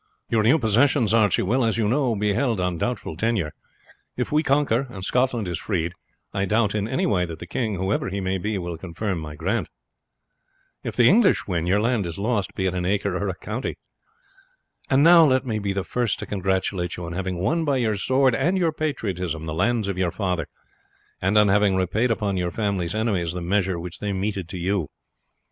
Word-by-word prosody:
"Your 115 -2 +3
new 120 +9 +5
possessions, 120 -1 +3
Archie, 110 -3 +3
will, 125 +7 +1
as 115 -1 +1
you 110 -2 +1
know, 125 0 +1
be 105 0 +1
held 115 -2 0
on 90 -2 -1
doubtful 120 -8 -3
tenure. 100 -4 0 0.7
If - - -2
we 150 +1 +3
conquer, 135 -3 +1
and 95 -5 -6
Scotland 125 -4 +1
is 85 -2 -3
freed, 85 -4 -2 0.4
I 100 0 0
doubt 105 +1 +1
in 105 -1 -1
no 130 +4 0
way 95 -4 +2
that 80 -1 -7
the 85 - -8
king, 110 +3 -2
whoever 95 +2 -1
he 100 +1 -3
may 95 0 -1
be, 105 +2 -2
will 85 -3 -5
confirm 95 +2 -3
my 75 -1 -7
grant. - - -1 1.1
If - - -4
the 120 - +5
English 205 - +4
win, 85 -3 -2
your 100 +3 +3
land 115 -4 +1
is 85 - -5
lost, 105 -2 -1
be 95 - -1
it 95 - 0
an 90 -1 -2
acre 100 0 0
or 100 +2 -1
a 95 - -3
county. 110 +7 -4 1.1
And 135 +1 +4
now 170 0 +8
let 130 -3 +3
me 110 -4 -1
be 100 -1 -2
the 95 -1 -2
first 120 -1 -1
to - - -6
congratulate 95 -2 -1
you 85 - -5
on 85 - -6
having 95 0 -3
won 160 - 0
by 145 -3 +1
your 110 -4 +1
sword 130 +5 +2
and 175 +10 +1
your 170 -3 +2
patriotism 95 - -3
the 80 - -4
lands 110 +5 +1
of 95 -2 -3
your 90 -2 +2
father, 90 -6 -2 0.7
and 95 +3 +2
on 105 -1 +6
having 100 -1 +3
repaid 95 +6 +1
upon 105 -4 0
your 90 -1 0
family's 100 -2 -2
enemies 100 -7 0
the 90 - -4
measure 95 0 0
which 85 0 -7
they 105 -1 -2
meted 95 -2 -3
to 95 - -5
you. 90 -2 -1
100 Hz, 210 wpm, -24 LUFS, 90-115 Hz, 1.1 s, now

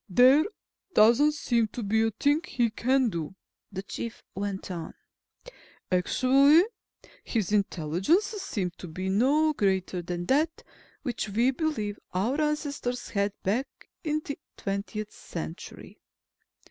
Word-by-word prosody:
"There 260 - +6 0.5
doesn't 240 +8 +6
seem 235 -7 +1
to 240 - -4
be 220 +2 +2
a 225 - +3
thing 285 +8 +1
he 235 -3 0
can 255 +2 +2
do," 170 -1 -5 0.4
the 190 0 -5
Chief 230 +2 -6
went 195 -1 -4
on. 170 -2 -6 1.0
"Actually, 270 - +5 0.6
his 215 -5 -1
intelligence 195 - +2
seems 305 - -3
to 180 - -8
be 185 +4 -4
no 285 +10 +3
greater 190 -6 0
than 175 0 -4
that 305 - +1 0.4
which 240 -5 -3
we 235 +6 +3
believe 250 -8 -2 0.2
our 240 +11 +1
ancestors 285 -5 -2
had, 200 -1 0
back 230 +9 0 0.4
in 305 -1 -1
the 285 - -5 0.2
twentieth 205 +2 -4
century." 170 +3 -8
225 Hz, 125 wpm, -28 LUFS, 195-280 Hz, 1.0 s, There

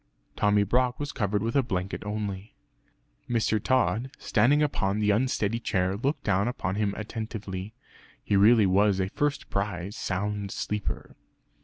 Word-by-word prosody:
Tommy 105 0 +3
Brock 125 +4 +1
was 145 0 -3
covered 105 -2 -1
with 115 +3 -2
a 140 - +5
blanket 95 -6 -3
only.) 105 -1 -4 0.7
Mr. 110 -3 +1
Tod 125 -1 +1
standing 135 +7 +3
on 100 -9 0
the 105 -1 +2
unsteady 115 -1 +1
chair 95 -4 0
looked 135 +7 -1
down 100 +1 +2
upon 100 -6 -2
him 100 -1 0
attentively; 110 -2 -5 0.5
he 100 - 0
really 105 +2 +6
was 100 +1 +3
a 95 0 0
first 145 +6 -2
prize 100 0 -2
sound 100 +1 -2
sleeper! 95 -11 -4
105 Hz, 145 wpm, -27 LUFS, 100-115 Hz, 0.7 s, really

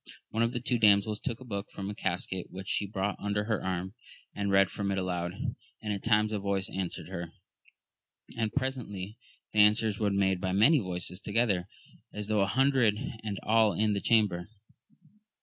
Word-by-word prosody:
One 110 - -1
of 115 0 +2
the 120 -1 -3 0.2
damsels 105 0 +4
took 120 -3 -4
a 130 - -11
book 100 -3 -4
from 100 - -6
a 105 - -3
casket 90 -1 -2
which 95 +1 -8
she 105 - 0
brought 100 0 -2
under 105 0 -1
her 110 -1 -1
arm, 95 +1 -2 0.4
and 100 0 -2
read 95 -1 +4
from 100 -1 -2
it 100 - 0
aloud, 90 -1 -2 0.5
and 105 -1 -3
at 100 - -4
times 105 -1 +3
a 105 - 0
voice 100 -1 -1
answered 90 -3 -3
her, 85 -3 -5 1.0
and 110 -2 -1
presently 120 -7 -3 0.3
the 105 - +2
an 105 0 +8
swers 110 -3 -1
were 105 -2 +2
made 95 -2 +1
by 95 -1 -1
many 135 +11 +6
voices 90 -2 -5
together, 105 -4 +1 0.4
as 105 0 -6
tho' 105 -2 +2
an 95 - +3
hundred, 130 -2 +3 0.3
and 105 -3 -3
all 110 -1 +4
in 105 0 +1
the 100 - -1
chamber. 105 -5 +2
100 Hz, 185 wpm, -30 LUFS, 95-110 Hz, 1.0 s, an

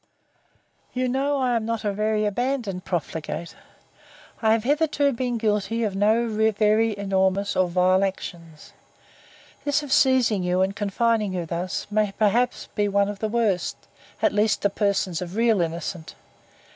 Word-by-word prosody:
You 255 0 0
know 275 +3 0
I 255 -2 +1
am 230 - 0
not 230 0 -3
a 205 - 0
very 215 +1 0
abandoned 220 -3 -2
profligate; 170 -1 -4 0.9
I 220 -1 +4
have 225 -1 0
hitherto 290 0 +1
been 245 0 -2
guilty 220 +1 0
of 205 -3 -1
no 220 +4 +2
very 220 0 +2
enormous 195 0 0
or 185 - +3
vile 185 +2 +3
actions. 170 -5 -6 0.9
This 290 +1 +1
of 280 -2 -2
seizing 255 -7 +3
you, 180 +1 +1
and 195 +1 -2
confining 210 0 0
you 175 -2 -2
thus, 170 +3 -3
may 210 -1 +1
perhaps 225 +4 +1
be 205 -1 +1
one 200 0 +2
of 205 -1 -6
the 220 - -2
worst, 215 -5 0 0.5
at - - +3
least 210 0 +1
to 205 - +2
persons 195 -4 0
of 180 +1 -6
real 225 -4 +3
innocence. 165 0 -4
210 Hz, 155 wpm, -24 LUFS, 190-230 Hz, 0.9 s, I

